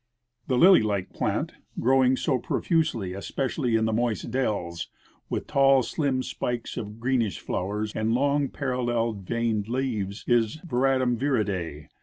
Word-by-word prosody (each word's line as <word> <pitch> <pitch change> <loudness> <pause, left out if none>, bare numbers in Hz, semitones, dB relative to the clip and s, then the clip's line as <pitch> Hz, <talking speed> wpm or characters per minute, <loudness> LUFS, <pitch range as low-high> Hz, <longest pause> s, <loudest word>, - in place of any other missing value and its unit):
The 130 - +1
lily 185 +6 +7
like 100 -3 -2
plant - - -1 0.3
growing 130 +1 +4
so 130 -2 0
pro - - -2
fusely, 155 - 0
especially 125 +4 -1
in 110 0 +2
the 110 - 0
moist 115 0 -1
dells, 100 -9 -2 0.4
Avith - - -2
tall, 135 -1 +4
slim 130 0 -1
spikes 120 -2 -4
of 105 -1 -6
greenish 120 -4 0
floAvers 105 +3 -2
and 110 +1 0
long 140 +1 +2
parallel 120 -3 -1
veined 110 +1 -2
leaves, 115 -6 -2
is 120 -1 +2
Veratrum 130 -4 +1
viride. 100 - -1
120 Hz, 140 wpm, -26 LUFS, 105-130 Hz, 0.4 s, lily